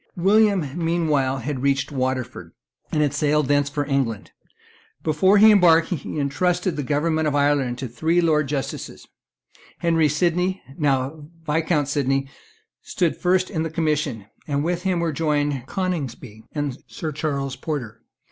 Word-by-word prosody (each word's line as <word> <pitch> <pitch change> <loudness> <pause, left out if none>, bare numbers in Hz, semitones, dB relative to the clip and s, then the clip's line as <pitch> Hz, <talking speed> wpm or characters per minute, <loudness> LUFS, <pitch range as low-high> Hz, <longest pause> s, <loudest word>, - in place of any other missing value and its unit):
William 200 -2 +3 0.2
meanwhile 155 -6 +1
had 135 +1 -4
reached 135 0 0
Waterford, 130 - -3 0.4
and 150 - +2
had 145 - 0
sailed 150 -1 +1
thence 145 0 +2
for 145 0 -2
England. 135 -6 -1 0.7
Before 175 +6 +3
he 215 +2 +8
embarked, 170 -5 +5
he 155 -4 -4
entrusted 175 +6 0
the 150 - -2
government 155 +3 0
of 145 - 0
Ireland 140 -4 +1
to 130 0 -4
three 160 +9 0
Lords 155 -4 +2
Justices. 140 -2 -5 0.7
Henry 165 -3 +2
Sydney, 180 +5 0 0.2
now 145 0 -1 0.2
Viscount 155 -1 +1
Sydney, 135 -1 0 0.5
stood 175 -4 -1
first 185 +1 +1
in 160 -5 -1
the 160 - -2
commission; 150 -8 -1 0.2
and 145 -1 0
with 175 +1 -1
him 185 -2 0
were 165 -2 -1
joined 145 -4 -1
Coningsby 135 - -4
and 145 -3 -3
Sir 155 - -5
Charles 140 -3 -3
Porter. 125 -8 -5
150 Hz, 145 wpm, -23 LUFS, 135-165 Hz, 0.7 s, he